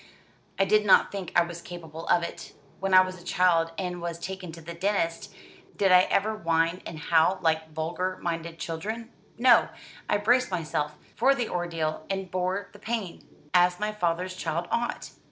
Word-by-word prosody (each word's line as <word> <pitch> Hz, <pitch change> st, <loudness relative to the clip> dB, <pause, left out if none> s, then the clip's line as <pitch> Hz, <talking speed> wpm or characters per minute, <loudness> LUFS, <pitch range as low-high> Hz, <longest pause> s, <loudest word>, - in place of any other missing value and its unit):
"I 195 Hz, -, +3 dB
did 210 Hz, +2 st, +4 dB
not 200 Hz, -, +5 dB
think 195 Hz, -3 st, -5 dB
I 175 Hz, -, +6 dB
was 170 Hz, 0 st, -7 dB
capable 165 Hz, -2 st, -9 dB
of 170 Hz, -, +3 dB
it. 170 Hz, -, -7 dB, 0.3 s
When 195 Hz, 0 st, -2 dB
I 185 Hz, 0 st, +9 dB
was 185 Hz, -1 st, -4 dB
a -, -, -15 dB
child, 175 Hz, -2 st, +2 dB
and 180 Hz, -2 st, -3 dB
was 170 Hz, -1 st, -4 dB
taken 185 Hz, 0 st, -6 dB
to 165 Hz, -, -9 dB
the 170 Hz, +1 st, -8 dB
dentist, 170 Hz, -2 st, -1 dB, 0.5 s
did 195 Hz, -2 st, +3 dB
I 180 Hz, 0 st, +7 dB
ever 215 Hz, +2 st, +1 dB
whine 165 Hz, -2 st, 0 dB
and 165 Hz, -, -7 dB
howl 165 Hz, +4 st, +3 dB
like 160 Hz, -1 st, +1 dB
vulgar 170 Hz, +4 st, -3 dB
minded 165 Hz, -1 st, -4 dB
children? 220 Hz, +9 st, -5 dB, 0.3 s
No; 245 Hz, 0 st, +5 dB, 0.4 s
I -, -, +3 dB
braced 245 Hz, +5 st, +3 dB
myself 150 Hz, -4 st, -2 dB, 0.2 s
for 275 Hz, +1 st, +4 dB
the 245 Hz, -4 st, -2 dB
ordeal, 165 Hz, -3 st, -3 dB
and 195 Hz, -2 st, -3 dB
bore 185 Hz, +2 st, -2 dB
the 205 Hz, -, -14 dB
pain, 220 Hz, -5 st, -4 dB, 0.3 s
as 180 Hz, 0 st, +4 dB
my 210 Hz, 0 st, -1 dB
father's 180 Hz, -2 st, -1 dB
child 170 Hz, -1 st, -3 dB
ought." 240 Hz, +1 st, -2 dB
180 Hz, 180 wpm, -27 LUFS, 165-195 Hz, 0.5 s, I